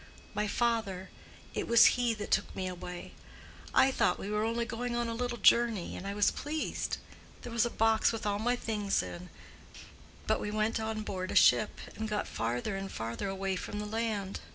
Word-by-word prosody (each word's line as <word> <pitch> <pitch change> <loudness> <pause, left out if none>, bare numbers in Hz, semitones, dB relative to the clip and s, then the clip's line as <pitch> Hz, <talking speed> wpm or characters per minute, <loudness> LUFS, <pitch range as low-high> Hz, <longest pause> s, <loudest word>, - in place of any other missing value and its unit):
My 210 0 0
father—it 210 -5 -3
was 235 0 +8
he 240 -2 +1
that 210 -1 -6
took - - +1
me 185 - -2
away. 180 -1 -7 0.6
I 265 - +5
thought 180 -8 +2
we 200 - -5
were 210 0 +1
only 230 +1 0
going 235 +1 -3
on 240 0 0
a 230 - -2
little 245 +1 -2
journey; 225 -2 +4
and 195 - -6
I 200 - -3
was 205 -1 +4
pleased. 305 +2 -3 0.5
There 245 - -6
was 235 0 +2
a - - -3
box 225 -1 +3
with 225 -2 -5
all 205 0 0
my 245 +3 +2
little 245 - -6
things 210 -3 0
in. 180 +1 -8 1.0
But - - +2
we - - -3
went 215 +2 0
on 220 -1 -2
board 185 -3 -4
a - - -4
ship, - - +5 0.2
and 220 0 -3
got 210 -1 -1
farther 120 - -2
and 195 0 -4
farther 115 - -4
away 195 0 -2
from 205 +3 -5
the 210 - -3
land. 210 -3 -2
215 Hz, 200 wpm, -31 LUFS, 195-230 Hz, 1.0 s, was